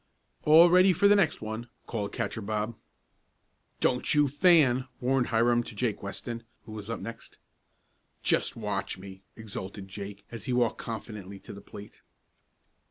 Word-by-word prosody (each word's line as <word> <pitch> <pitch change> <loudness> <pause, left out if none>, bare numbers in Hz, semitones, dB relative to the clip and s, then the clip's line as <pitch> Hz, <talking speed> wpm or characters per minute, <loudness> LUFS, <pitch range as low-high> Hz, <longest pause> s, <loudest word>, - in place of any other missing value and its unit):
"All 160 +3 +8
ready 185 +1 +6
for 200 +4 +4
the 205 - +6
next 170 - +2
one!" 110 +2 -5 0.2
called 105 -3 -3
Catcher 110 - -3
Bob. 110 +2 -2 1.0
"Don't 125 +4 +2
you 150 -1 +5
fan!" 140 -4 +4
warned 125 0 +1
Hiram 120 +1 +3
to 120 -1 -9
Jake 115 -1 -1
Weston, 115 +4 -5 0.2
who 110 - -12
was 105 0 -7
next 115 0 -6
up. - - -34 0.8
"Just - - +1
watch 105 -4 -3
me!" 95 0 -11
exulted 100 -2 -7
Jake 100 +1 -8
as 115 -2 -7
he 125 - -1
walked 120 -2 +1
confidently 105 -4 -7
to - - -10
the 100 - -10
plate. 100 +1 -12
115 Hz, 155 wpm, -28 LUFS, 105-130 Hz, 1.0 s, All